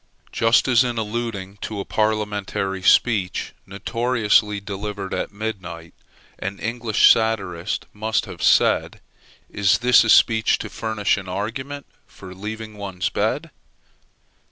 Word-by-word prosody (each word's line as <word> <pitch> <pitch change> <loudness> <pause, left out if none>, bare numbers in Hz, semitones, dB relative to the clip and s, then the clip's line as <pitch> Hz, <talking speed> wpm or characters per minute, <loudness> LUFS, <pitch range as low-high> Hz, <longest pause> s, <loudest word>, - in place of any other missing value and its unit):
Just 115 +4 +3
as, 125 -1 +5
in 120 -2 -3
alluding 105 -3 -4
to 105 +1 -5
a 100 - -4
parliamentary 105 -3 -1
speech 95 -2 +2
notoriously 105 0 +1
delivered 100 0 -5
at - - -3
midnight, 95 -6 -6 0.5
an 100 +1 -4
English 115 -1 +3
satirist 100 -5 -1
must 110 +1 -1
have - - -10
said, - - +3 0.5
Is 100 -2 +2
this 125 +1 +5
a 110 - -2
speech 110 0 +4
to - - -7
furnish 110 -3 -1
an 95 -2 -7
argument 125 +9 -5 0.2
for 95 -2 -12
leaving 110 +2 -7
one's 95 -2 -3
bed? - - -2
105 Hz, 125 wpm, -22 LUFS, 100-115 Hz, 0.5 s, as